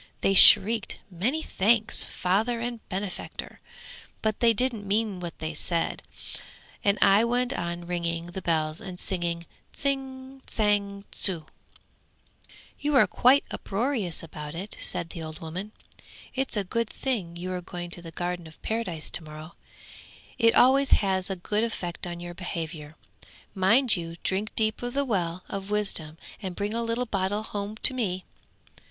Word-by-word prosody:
They 195 - +3
shrieked 215 +3 +9
"Many 245 - -1
thanks, 220 +3 +2
Father 215 +6 0
and 240 0 -4
benefactor," 190 -1 -5 0.6
but 220 -1 0
they 235 -1 +5
didn't 225 -3 -1
mean 205 -1 0
what 170 -2 -7
they 160 0 -4
said, 165 +2 -1 0.8
and 200 0 +3
I 200 +2 +6
went 245 +2 0
on 170 -6 -4
ringing 170 -1 -2
the 190 - -6
bells 155 -1 0
and 185 -4 -7
singing 170 -2 -1 0.3
"Tsing, 270 -1 -3
tsang, 200 -2 0
tsu!"' 170 -5 +2 1.3
'You're 285 -2 +4
quite 265 +3 +4
uproarious 210 - -2
about 150 -1 -8
it!' 195 +5 -7
said 175 -2 -3
the 165 - -7
old 155 0 -7
woman. 180 +6 -6 0.6
'It's 265 -3 0
a 205 - +1
good 230 +4 -2
thing 205 -11 -3
you 180 +2 -5
are 180 - -3
going 175 0 -7
to 175 - -2
the 170 - -9
Garden 175 0 -4
of 160 - -16
Paradise 215 -8 -3
to - - -2
morrow; 155 +1 -10 0.9
it 230 -1 +4
always 270 +2 +5
has 190 -1 0
a 195 - -2
good 210 +4 -1
effect 180 -6 -4
on 175 0 -6
your 175 0 -7
behaviour. 160 -4 -6 0.6
Mind 220 +6 +4
you 165 -2 -5
drink 200 +3 -2
deep 220 0 0
of 245 +1 -4
the 280 0 +1
well 180 -6 -2
of 195 0 -6
wisdom, 195 -7 -2 0.2
and 185 -3 -5
bring 205 +3 -2
a 230 - -1
little 230 +2 -1
bottleful 205 -1 -1
home 205 +1 -5
to - - +5
me.' 190 -7 -2
195 Hz, 155 wpm, -26 LUFS, 175-230 Hz, 1.3 s, shrieked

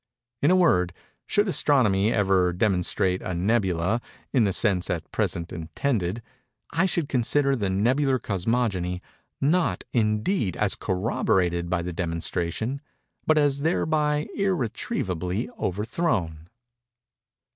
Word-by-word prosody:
—In 145 - +4
a 185 - +5
word, 90 - +3 0.3
should 205 +1 +2
Astronomy 115 - +3
ever 95 -4 +2
demonstrate 90 -1 +1
a 90 - -4
"nebula," 95 +1 +1 0.3
in 125 -5 +4
the 100 - +1
sense 95 -2 +1
at 85 -3 -3
present 85 0 -2
intended, 90 - -2 0.5
I 170 +5 +2
should 170 -5 0
consider 140 +2 +2
the 100 -6 -1
Nebular 130 +8 +2
Cosmogony—not, 110 - -1
indeed, 110 - 0
as - - +2
corroborated 90 -3 0
by 90 -1 0
the 90 0 -4
demonstration—but 90 - -3
as 145 -2 +2
thereby 150 -1 +1
irretrievably 115 - -2
overthrown. 95 - -2
105 Hz, 105 wpm, -25 LUFS, 90-140 Hz, 0.5 s, a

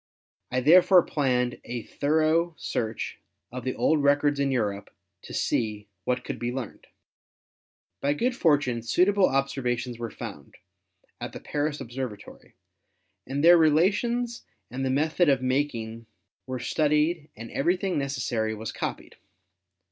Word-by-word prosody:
I 130 0 0
therefore 175 +5 +7
planned 125 -4 0
a 120 -2 -5
thoro 160 +3 +1
search 110 -1 -3 0.3
of 125 +1 -6
the 130 - -2
old 155 -2 +2
rec 145 +1 +3
ords 145 -1 +2
in 140 -1 +1
Europe 105 -6 -1 0.3
to - - -12
see 105 -2 -1 0.2
what 125 0 0
could - - -5
be 120 0 -2
learned." 125 -4 -7 1.1
By 140 +1 +2
good 245 +10 0
fortune 145 - +2
suitable 185 - +3
observations 125 -3 -1
were 115 -1 -4
found 70 -8 -9 0.6
at - - -6
the - - -7
Paris 150 0 -2
Observatory 120 -4 -7 0.7
and 140 +3 -2
their 175 +1 +8
relations 210 +10 +2 0.3
and 130 +2 -3
the 130 - 0
method 155 +5 +2
of 135 -2 +2
making 115 -4 -2 0.4
were 130 0 -3
studied 150 +4 +1
and 115 +1 -8
everything 180 +3 0
necessary 120 -5 -2
was 110 -1 -5
copied. - - -5
135 Hz, 135 wpm, -26 LUFS, 120-155 Hz, 1.1 s, their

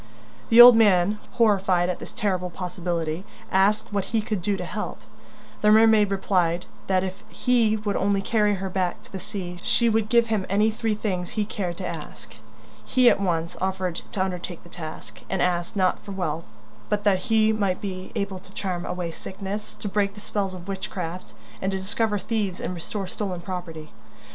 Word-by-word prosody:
The 230 - +6
old 240 0 +12
man, 205 -2 +4
horrified 195 -6 +3
at 180 - -2
this - - -8
terrible 185 -4 -1
possibility, 175 -2 -3 0.3
asked 200 +3 +2
what 200 -2 0
he 225 - 0
could 215 -3 -2
do 200 +2 0
to - - -4
help. - - -5 0.6
The 210 - +4
mermaid 220 -1 +6
replied 180 -3 +1 0.2
that 185 -1 +2
if 190 +2 -5
he 230 -2 +2
would 210 -1 -2
only 200 0 +2
carry 210 -1 +2
her 190 0 -4
back 185 -1 -2
to - - -18
the 190 - -5
sea, 180 -2 -6
she 235 +4 +3
would 220 -1 +1
give 235 0 +5
him 215 -4 -1
any 210 +3 +3
three 220 0 -1
things 185 -4 -2
he 210 -2 -1
cared 180 -4 -4
to 190 - -5
ask. 130 -9 -8 0.5
He 250 -2 +5
at - - 0
once 170 -3 -1
offered 185 -2 -1
to 190 -4 +1
undertake 180 -2 -5
the 175 - -15
task, 155 -10 -9
and 190 - -1
asked, 175 +2 0
not 185 -2 +2
for 200 - -7
wealth, 165 -4 -2 0.4
but 205 0 0
that 195 -3 +3
he 220 -1 +4
might 200 -4 0
be 185 -2 -6
able 200 -3 -2
to 195 +1 -15
charm 180 -3 -3
away 180 -2 -3
sickness, 195 +4 -6
to - - -6
break 200 0 0
the - - -9
spells 200 -2 -2
of 180 0 -10
witchcraft, 185 -2 -5 0.3
and 190 - 0
to 190 - -1
discover 205 +3 0
thieves 205 -3 -2
and - - -3
restore 190 +3 -4
stolen 185 -1 -4
property. 175 -4 -6
195 Hz, 190 wpm, -25 LUFS, 180-210 Hz, 0.6 s, old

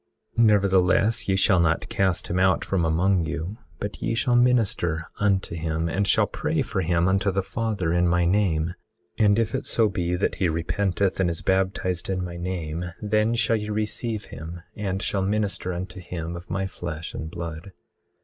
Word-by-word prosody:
18:30 115 - +5
Nevertheless, 100 +1 +3
ye 95 - +3
shall 95 -1 +4
not 80 -1 +2
cast 95 -3 0
him 90 - -1
out 95 -1 +3
from 95 -3 0
among 90 +3 +2
you, 85 +7 -4 0.2
but 105 0 -6
ye 115 - 0
shall 120 +1 +2
minister 110 -10 +2
unto 100 -3 +1
him 80 0 -1
and 95 +4 0
shall - - +4
pray - - -1
for - - -2
him 85 +1 +2
unto 95 +1 +2
the 95 0 0
Father, 105 -6 -1
in 90 0 +3
my 85 0 +2
name; 85 -3 +1 0.5
and 105 -1 +5
if 115 -1 0
it - - -2
so 115 -2 +3
be 90 -2 -1
that 90 - 0
he 90 - +3
repenteth 95 +4 0
and 95 -2 +3
is 85 - -4
baptized 95 -2 0
in 95 -1 -1
my 85 -1 -6
name, 85 -2 -3 0.2
then 110 +2 +1
shall 115 -1 +2
ye 105 0 -5
receive 110 +1 -2
him, 85 +2 -8
and 95 -2 -2
shall 100 - 0
minister 100 -1 -1
unto 90 +1 -5
him 85 -1 -5
of 85 +1 -9
my 95 0 -1
flesh 85 -3 -6
and 80 - -5
blood. 85 +2 -6
95 Hz, 190 wpm, -25 LUFS, 85-105 Hz, 0.5 s, 18:30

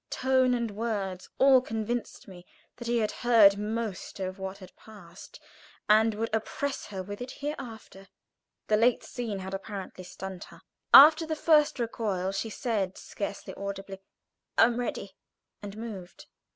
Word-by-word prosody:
Tone 260 -1 +2
and 235 -2 -2
words 200 -4 -4
all 265 -1 +6
convinced 225 0 -4
me 180 -2 -12 0.3
that 240 - -7
he 240 0 +1
had 215 -2 0
heard 225 -5 +6
most 215 -2 -4
of 185 0 -4
what 190 0 -5
had 185 -2 -14
passed, 190 -5 -14 0.5
and 220 0 +4
would 225 +1 -3
oppress 270 +5 -3
her 190 -2 -6
with 205 +4 -8
it 250 - -5
hereafter. 240 -9 -8 0.6
The 215 - +2
late 235 +2 +3
scene 230 -5 -5
had 190 0 -7
apparently 195 -1 -7
stunned 190 0 -8
her. - - -16 0.3
After 315 +3 +9
the 315 - -2
first 305 -2 +3
recoil 210 -6 -2
she 195 +3 -3
said, 205 -4 -2
scarcely 200 -1 -6
audibly, 195 -1 -7 0.6
"I - - +7
am 235 +1 +2
ready," 200 -5 -4 0.5
and 205 0 -8
moved. 205 -6 -8
215 Hz, 150 wpm, -28 LUFS, 195-240 Hz, 0.6 s, After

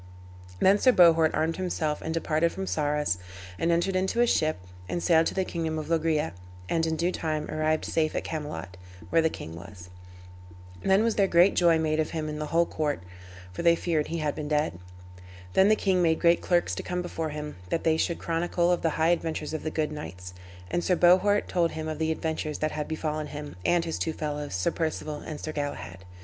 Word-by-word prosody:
Then 195 +2 +5
Sir 255 - +5
Bohort 165 -4 +6
armed 160 +1 0
himself 165 -5 -2
and 160 - -4
departed 165 0 +1
from 190 - -5
Sarras, 150 - 0 0.4
and 170 - +2
entered 175 +3 +1
into 190 +5 0
a 240 - +6
ship, 155 -9 +1 0.3
and 175 - -2
sailed 165 -2 +4
to - - -3
the 190 -1 +1
kingdom 160 -3 -3
of 155 0 -5
Loegria, 160 -1 +1 0.4
and 165 - +1
in 160 - 0
due 170 +3 0
time 155 -3 -2
arrived 155 0 0
safe 155 -1 0
at - - -1
Camelot, 150 - -5 0.3
where 165 - +5
the 160 - +2
king 80 - -8
was. 90 +1 -11 0.9
Then 195 +2 +3
was 230 -1 0
there 200 -1 +4
great 175 +2 +5
joy 170 -2 +4
made 155 -1 0
of 155 - 0
him 155 -2 -3
in 150 0 -5
the 150 - -3
whole 170 +2 +3
court, 150 - -2 0.5
for - - -4
they 170 0 +5
feared 165 -3 -1
he 165 - -3
had 150 -3 -1
been 150 - -5
dead. 150 - 0 0.7
Then 190 +2 +5
the 215 - +5
king 190 -3 +1
made 160 -2 +2
great 170 0 +4
clerks 175 -1 +1
to - - -3
come 180 0 -3
before 165 -2 -3
him, 150 -3 -6
that 165 - -1
they 160 -1 +3
should 170 +1 0
chronicle 170 +1 0
of 175 - +1
the 165 - +2
high 160 +1 +3
adventures 160 -3 -1
of 155 - -3
the 155 - -3
good 155 -1 -1
knights. 90 - -8 0.4
And 175 - 0
Sir 180 - +2
Bohort 185 +4 +4
told 170 -2 +1
him 155 0 -4
of 155 -1 -4
the 160 0 +1
adventures 160 -2 -3
that 155 0 -1
had 150 -1 -4
befallen 155 -1 -3
him, 145 0 -7
and 175 - +2
his 165 - -3
two 160 - -1
fellows, 150 -7 -4
Sir 90 - +1
Perceval 155 -2 -3
and 150 -2 -5
Sir 155 - -4
Galahad. 120 - -5
160 Hz, 215 wpm, -27 LUFS, 150-170 Hz, 0.9 s, Bohort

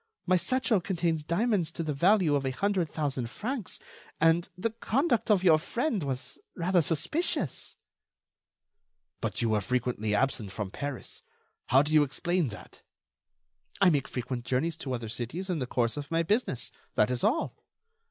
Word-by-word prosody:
My 185 - +4
satchel 225 +1 +2
contains 170 -4 0
diamonds 180 0 +1
to 165 - -3
the 155 -2 -1
value 180 +2 +4
of 140 -1 +1
a 135 - 0
hundred 185 +4 0
thousand 135 -6 -2
francs, 230 - -4 0.4
and 165 +2 +3
the 220 +5 -1
conduct 240 +3 0
of 200 -3 +4
your 160 -4 +6
friend 235 - -1
was 130 -2 -4 0.2
rather 180 0 +2
suspicious." 165 - -1 1.4
"But - - -2
you 115 - +2
were 105 -1 +2
frequently 115 -1 -1
absent 120 -3 0
from 100 -1 -4
Paris. 140 0 -6 0.5
How 135 +3 +5
do 150 +1 -3
you 155 - +7
explain 170 +4 0
that?" 105 - -10 1.0
"I 195 -3 +6
make 145 -4 +1
frequent 125 -1 -4
journeys 140 +7 0
to 135 -5 -4
other 120 -2 -3
cities 125 - -4
in 170 - -1
the 130 - -2
course 120 +1 0
of 145 -1 -5
my 165 0 +1
business. 205 - 0 0.2
That 105 +4 +3
is 125 -1 -2
all." 270 +10 +1
155 Hz, 160 wpm, -29 LUFS, 130-185 Hz, 1.4 s, you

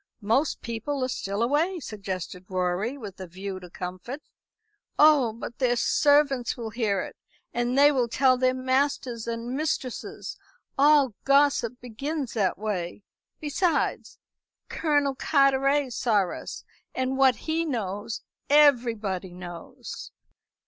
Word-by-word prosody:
"Most 250 +9 +1
people 240 +4 -3
are - - +1
still 200 -3 -2
away," 315 +9 +1
suggested 190 - -6
Rorie, 185 +7 -1
with 205 -7 -9
a 185 - -6
view 190 +2 -6
to 180 -1 -11
comfort. 185 - -6 0.8
"Oh, 295 -6 +6
but 230 +1 -8
their 250 -2 +2
servants 280 -1 +3
will 225 -2 -5
hear 215 -3 0
it, - - -7 0.4
and 240 +2 0
they 290 +1 +7
will 255 -4 +1
tell 255 +2 +3
their 255 0 +2
masters 260 -3 0
and 235 +2 -3
mistresses. 280 -4 -3 0.4
All 285 -3 +5
gossip 275 -3 +3
begins 270 +4 -4
that 195 -5 +1
way. 200 -2 -4 0.4
Besides, 310 +2 -1 0.5
Colonel 290 -3 +1
Carteret 275 -1 +2
saw 210 -7 +1
us, - - -7 0.3
and 260 0 -1
what 265 -2 +5
he 320 +1 -1
knows 215 - -3 0.3
everybody 230 -11 +3
knows." 175 -2 -8
250 Hz, 125 wpm, -26 LUFS, 205-280 Hz, 0.8 s, they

